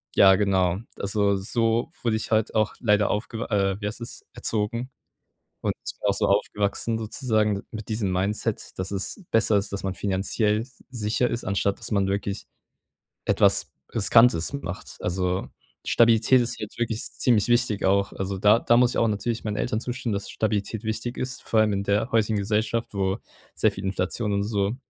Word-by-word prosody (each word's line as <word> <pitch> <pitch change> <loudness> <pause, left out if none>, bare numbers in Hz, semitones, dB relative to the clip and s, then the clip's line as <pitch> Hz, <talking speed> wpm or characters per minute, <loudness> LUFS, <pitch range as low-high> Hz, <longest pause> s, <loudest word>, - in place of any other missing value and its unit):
Ja, 95 -1 +7
genau. 95 -3 +2 0.2
Also, 100 0 +1
so 115 +3 0
wurde 115 -2 +1
ich - - -5
halt 110 -1 +1
auch 110 -2 +1
leider 105 -3 +3
aufge 115 +2 -3
äh, 100 -1 0
wie 105 - -1
heißt 110 - -5
das, 120 - -7
erzogen 115 +4 -1 0.7
und - - 0 0.3
auch - - +2
so - - 0
aufgewachsen 105 +2 0
sozusagen 110 -2 0
d 100 - -5
mit 110 0 -7
diesem 105 -4 -1
Mindset, 95 +3 -2
dass 95 +1 -3
es 100 - -3
besser 110 -2 +4
ist, 100 0 -2
dass 100 - -3
man 95 -1 -2
finanziell 105 +3 0 0.3
sicher 115 +1 0
ist, 120 - -3
anstatt 100 0 0
dass - - -5
man 100 -3 +1
wirklich 100 +1 -2 0.8
etwas - - +3 0.2
Riskantes 115 -5 +4
macht. 140 -11 -6
Also, 90 +1 -1 0.4
Stabilität 115 +2 +5
ist 120 -1 -1
jetzt 105 - -7
wirklich 115 -2 -1
ziemlich 115 -4 +2
wichtig 120 -4 +2
auch. 100 +1 +2
Also 95 0 -3
da 105 +4 +5
da 120 - +3
muss 125 0 +4
ich - - -3
auch 115 - +3
natürlich 110 +3 -2
meinen 105 -1 -2
Eltern 110 -2 -1
zustimmen, 125 -3 -3
dass 100 0 -3
Stabilität 110 0 -2
wichtig 110 +3 -3
ist, 130 -1 -4
vor 110 - +1
allem 105 -1 +2
in 100 0 -1
der 105 +6 0
heutigen 110 -1 +2
Gesellschaft, 110 +3 0
wo 95 +1 0 0.4
sehr 110 - +3
viel 95 0 -8
Inflation 100 +3 -1
und 100 0 +1
so 100 0 -1
105 Hz, 180 wpm, -25 LUFS, 100-115 Hz, 0.8 s, Ja